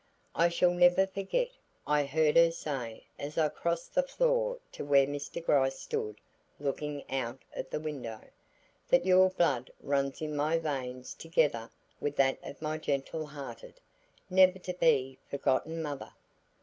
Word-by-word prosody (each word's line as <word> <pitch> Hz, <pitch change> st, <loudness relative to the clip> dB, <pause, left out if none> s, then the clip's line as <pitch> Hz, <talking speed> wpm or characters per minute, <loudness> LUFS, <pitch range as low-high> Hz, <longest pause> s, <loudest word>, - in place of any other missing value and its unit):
"I 170 Hz, +2 st, +4 dB
shall 175 Hz, +1 st, +3 dB
never 175 Hz, +2 st, +5 dB
forget," 195 Hz, -, -1 dB, 0.4 s
I 150 Hz, -1 st, +2 dB
heard 150 Hz, +2 st, +2 dB
her 170 Hz, 0 st, +7 dB
say 135 Hz, -8 st, -5 dB, 0.2 s
as 145 Hz, +2 st, -6 dB
I 155 Hz, -2 st, +3 dB
crossed 170 Hz, +3 st, -3 dB
the 275 Hz, -, +4 dB
floor -, -, +1 dB
to -, -, -6 dB
where 140 Hz, -1 st, +5 dB
Mr. 145 Hz, +4 st, -5 dB
Gryce 135 Hz, -3 st, +3 dB
stood 105 Hz, 0 st, -4 dB, 0.4 s
looking 145 Hz, +1 st, -3 dB
out 130 Hz, -2 st, -2 dB, 0.2 s
of 130 Hz, -, -5 dB
the -, -, -2 dB
window, 135 Hz, -8 st, -5 dB, 0.7 s
"that 175 Hz, 0 st, +4 dB
your 185 Hz, 0 st, +6 dB
blood 140 Hz, -9 st, +1 dB
runs 140 Hz, -1 st, -1 dB
in 155 Hz, -1 st, -3 dB
my 150 Hz, +3 st, +2 dB
veins 130 Hz, -5 st, -4 dB
together 150 Hz, -8 st, 0 dB, 0.3 s
with 145 Hz, 0 st, -2 dB
that 135 Hz, -1 st, +3 dB
of 140 Hz, -, -9 dB
my 155 Hz, +1 st, -2 dB
gentle 150 Hz, +2 st, -2 dB
hearted, 150 Hz, -, -9 dB, 0.5 s
never 185 Hz, 0 st, +5 dB
to 180 Hz, 0 st, -5 dB
be 140 Hz, -7 st, +2 dB
forgotten 155 Hz, +4 st, 0 dB
mother. 145 Hz, -2 st, -5 dB
150 Hz, 150 wpm, -31 LUFS, 140-170 Hz, 0.7 s, her